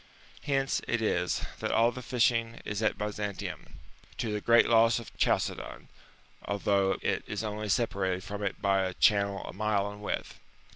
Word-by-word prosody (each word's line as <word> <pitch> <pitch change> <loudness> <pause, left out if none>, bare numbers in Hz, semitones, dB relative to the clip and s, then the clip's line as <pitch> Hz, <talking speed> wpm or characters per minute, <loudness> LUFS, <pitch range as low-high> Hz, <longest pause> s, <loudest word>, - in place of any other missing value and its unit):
^^ - - -25 0.4
Hence 135 -2 +1
it 120 - +1
is, 90 -5 0
that - - -2
all 115 +1 +4
the 125 - -7
fishing 115 -2 +1
is 105 +1 -3
at 110 - +1
Byzantium, 105 -1 -5 0.4
to 110 -3 -2
the 105 - -2
great 115 +2 +5
loss 115 0 +5
of 115 - -8
Chalcedon, - - 0
^^ - - -23 0.6
although 100 -1 +1
it - - 0
is 105 +1 -3
only 105 0 -4
separated 95 -4 0
from 105 0 -6
it 100 -2 -2
by 100 -1 +2
a 95 -1 -2
channel 100 -2 +3
a - - -7
mile 100 0 0
in 105 0 -11
width. 105 - -4
105 Hz, 180 wpm, -29 LUFS, 100-115 Hz, 0.6 s, great